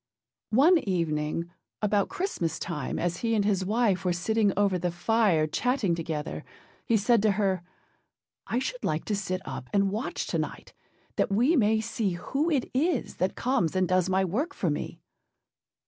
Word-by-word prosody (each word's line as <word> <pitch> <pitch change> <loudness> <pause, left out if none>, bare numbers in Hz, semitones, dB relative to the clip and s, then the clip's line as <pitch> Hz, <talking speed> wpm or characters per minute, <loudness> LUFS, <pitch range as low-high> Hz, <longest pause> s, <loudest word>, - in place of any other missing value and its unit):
One 325 +7 +6
evening, 165 - -1 0.3
about 205 -1 +1
Christmas 360 - -2
time, 150 -6 -4
as 175 0 -1
he 230 +2 0
and 205 -2 +2
his 195 -3 +1
wife 205 -2 +1
were 180 -1 +1
sitting 210 +4 +1
over 200 -3 +2
the 175 +1 0
fire 175 -2 +2
chatting 225 - 0
together, 160 -2 -4 0.4
he 230 - +4
said 225 +2 +3
to 215 -1 +3
her, 190 -3 0 0.9
âI 240 - +1
should - - -4
like 155 +1 -1
to 210 - 0
sit 185 -2 -2
up 130 -2 -6
and 200 -1 +2
watch 220 +5 -3
tonight, - - -4 0.4
that - - +1
we 245 +11 +3
may 220 -4 +3
see 220 -4 -1
who 275 - -1
it 280 -6 0
is 280 0 0
that 185 +1 0
comes 245 - 0
and 185 -1 +2
does 185 0 +2
my 190 0 +2
work 285 - -2
for - - 0
me. - - -4
200 Hz, 170 wpm, -27 LUFS, 175-230 Hz, 0.9 s, One